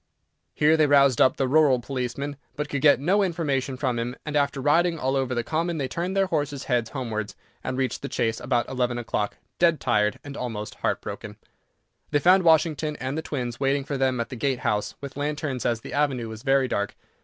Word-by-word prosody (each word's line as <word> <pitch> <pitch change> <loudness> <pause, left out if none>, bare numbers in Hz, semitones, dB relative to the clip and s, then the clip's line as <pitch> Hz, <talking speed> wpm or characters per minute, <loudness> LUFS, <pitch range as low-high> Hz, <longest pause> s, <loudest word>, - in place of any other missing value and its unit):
Here 155 +2 +4
they 155 -1 +4
roused 140 -3 +5
up 130 - +4
the 135 - +1
rural 140 -2 +4
policeman, 135 +3 -4 0.2
but 150 0 -3
could 140 -2 -2
get 145 -2 +6
no 185 +9 +2
information 145 -8 -1
from 125 -3 -1
him, 120 +2 -3
and, 150 -1 -4
after 140 -1 +1
riding 165 +5 +3
all 135 -2 0
over 130 -2 0
the 120 - 0
common, 165 +4 -1
they 135 -3 -1
turned 175 +8 -3
their 195 - +4
horses' 145 -5 -2
heads 120 -4 0
homewards, 110 -4 -4 0.3
and 130 0 -3
reached 130 -1 -1
the - - -5
Chase 115 0 -1
about 120 -1 0
eleven 125 -2 -1
o'clock, 110 -3 -2 0.2
dead 170 -2 +4
tired 105 -4 +1
and 145 -1 -8
almost 110 -5 -4
heart - - 0
broken. - - -7 0.7
They 150 - +2
found 180 +6 +5
Washington 160 -2 +3
and 130 0 -4
the 160 - -2
twins 125 -6 -4
waiting 135 0 +1
for 140 +1 -4
them 130 -2 +1
at 115 - -2
the 130 - -6
gate 130 +1 -1
house 105 -2 -1
with 140 -1 -8
lanterns, 145 -3 -2
as 115 -1 0
the - - -8
avenue 135 -5 0
was 110 0 -8
very 135 0 +3
dark. 100 -4 -2
135 Hz, 210 wpm, -25 LUFS, 125-150 Hz, 0.7 s, get